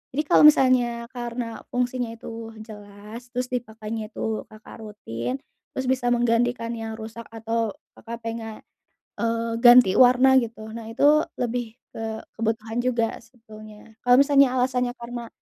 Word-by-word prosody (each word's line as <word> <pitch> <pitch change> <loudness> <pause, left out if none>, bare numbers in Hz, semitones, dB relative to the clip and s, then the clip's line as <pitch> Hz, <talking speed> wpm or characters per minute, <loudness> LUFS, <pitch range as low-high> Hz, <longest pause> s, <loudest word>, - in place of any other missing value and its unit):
Jadi 300 - +1
kalau - - +5
misalnya 250 -5 +4
karena 240 -2 -5
fungsinya 245 -1 -1
itu 225 0 -8 0.2
jelas, 210 +2 -11
terus 250 0 -1
dipakainya 220 -3 -5
itu 220 0 -3
Kakak 215 +1 -13
rutin, 125 - -5 0.4
terus 260 - -3
bisa 255 -2 +1
menggantikan 235 0 +1
yang 225 -1 -5
rusak 225 +1 -9
atau 225 -1 -2 0.2
Kakak 235 0 -9
pengen, 225 -1 -5 0.6
eee, 230 0 -1
ganti 240 -5 +8
warna 255 +1 +6
gitu, 225 -2 -7
nah, 230 - -7
itu 295 +6 +4 0.2
lebih 240 -2 -2 0.2
ke 220 0 -5 0.2
kebutuhan 225 0 -2
juga 235 -2 0
sebetulnya. 220 -2 -15
Kalau 245 +1 +6
misalnya 280 -2 +5
alasannya 250 -1 0
karena, 235 0 -7
230 Hz, 135 wpm, -24 LUFS, 220-245 Hz, 0.6 s, ganti